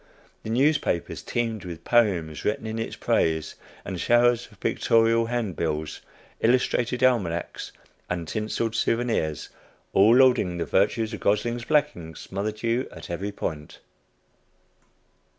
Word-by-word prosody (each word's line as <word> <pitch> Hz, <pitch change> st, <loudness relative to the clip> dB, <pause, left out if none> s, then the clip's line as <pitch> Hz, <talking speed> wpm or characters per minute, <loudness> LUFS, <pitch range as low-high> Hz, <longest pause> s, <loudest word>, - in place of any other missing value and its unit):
The -, -, -7 dB
newspapers 130 Hz, -, +1 dB
teemed 115 Hz, -3 st, -2 dB
with 85 Hz, -3 st, -8 dB
poems 95 Hz, -10 st, +1 dB
written 105 Hz, +1 st, -1 dB
in 110 Hz, 0 st, -4 dB
its 115 Hz, -, -4 dB
praise, 80 Hz, -1 st, 0 dB, 0.3 s
and 90 Hz, -2 st, -4 dB
showers 120 Hz, 0 st, +3 dB
of -, -, -20 dB
pictorial 115 Hz, 0 st, +2 dB
handbills, 85 Hz, -10 st, -2 dB, 0.4 s
illustrated 125 Hz, +1 st, +1 dB
almanacs, 95 Hz, -10 st, 0 dB, 0.4 s
and 85 Hz, -2 st, -3 dB
tinseled 110 Hz, +3 st, -2 dB
souvenirs, 115 Hz, -, -1 dB, 0.4 s
all 105 Hz, +5 st, +6 dB
lauding 125 Hz, -9 st, +4 dB
the 85 Hz, -, -2 dB
virtues 110 Hz, +3 st, +1 dB
of 110 Hz, -, -5 dB
"Gosling's 115 Hz, +3 st, 0 dB
Blacking," 145 Hz, -, 0 dB
smothered 105 Hz, +6 st, -5 dB
you 115 Hz, +3 st, 0 dB
at -, -, -9 dB
every 95 Hz, +4 st, -3 dB
point. 75 Hz, -6 st, -5 dB
110 Hz, 120 wpm, -25 LUFS, 85-120 Hz, 0.4 s, all